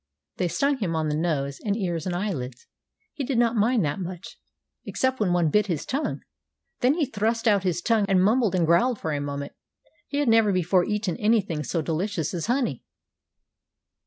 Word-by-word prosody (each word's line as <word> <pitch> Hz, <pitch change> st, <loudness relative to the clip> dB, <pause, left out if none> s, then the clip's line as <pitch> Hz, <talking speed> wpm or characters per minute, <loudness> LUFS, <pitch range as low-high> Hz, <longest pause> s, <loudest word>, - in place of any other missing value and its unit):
They 180 Hz, -, 0 dB
stung 275 Hz, -, 0 dB
him 175 Hz, -7 st, -1 dB
on 160 Hz, -1 st, 0 dB
his 150 Hz, -1 st, -1 dB
nose 140 Hz, -4 st, -1 dB
and 205 Hz, -1 st, 0 dB
ears 175 Hz, -5 st, -2 dB
and 175 Hz, -, -2 dB
eyelids. 135 Hz, -, -4 dB, 0.5 s
He 285 Hz, -, -4 dB
did 260 Hz, -1 st, -1 dB
not 235 Hz, 0 st, +3 dB
mind 225 Hz, -2 st, +2 dB
that 145 Hz, +5 st, -2 dB
much, 180 Hz, -1 st, -7 dB, 0.4 s
except 260 Hz, 0 st, -1 dB
when 205 Hz, -5 st, +1 dB
one 175 Hz, -3 st, +2 dB
bit 210 Hz, +4 st, +3 dB
his 170 Hz, -6 st, -2 dB
tongue. 280 Hz, +4 st, -2 dB, 0.6 s
Then 255 Hz, +4 st, +3 dB
he 325 Hz, -3 st, +1 dB
thrust 225 Hz, -1 st, -1 dB
out 205 Hz, -3 st, +4 dB
his 180 Hz, -2 st, -1 dB
tongue 225 Hz, -3 st, +2 dB
and 190 Hz, -1 st, +4 dB
mumbled 215 Hz, -1 st, +2 dB
and 175 Hz, -2 st, +2 dB
growled 190 Hz, +9 st, +3 dB
for 160 Hz, -, -3 dB
a 145 Hz, -, -2 dB
moment. 140 Hz, 0 st, -5 dB, 0.5 s
He 285 Hz, -, -4 dB
had 290 Hz, -2 st, +1 dB
never 225 Hz, -2 st, +4 dB
before 180 Hz, 0 st, +2 dB
eaten 210 Hz, -4 st, -2 dB
anything 205 Hz, -8 st, +1 dB
so 160 Hz, +5 st, -2 dB
delicious 170 Hz, +1 st, -2 dB
as 175 Hz, +1 st, -3 dB
honey. 240 Hz, -, 0 dB
190 Hz, 190 wpm, -25 LUFS, 165-225 Hz, 0.6 s, out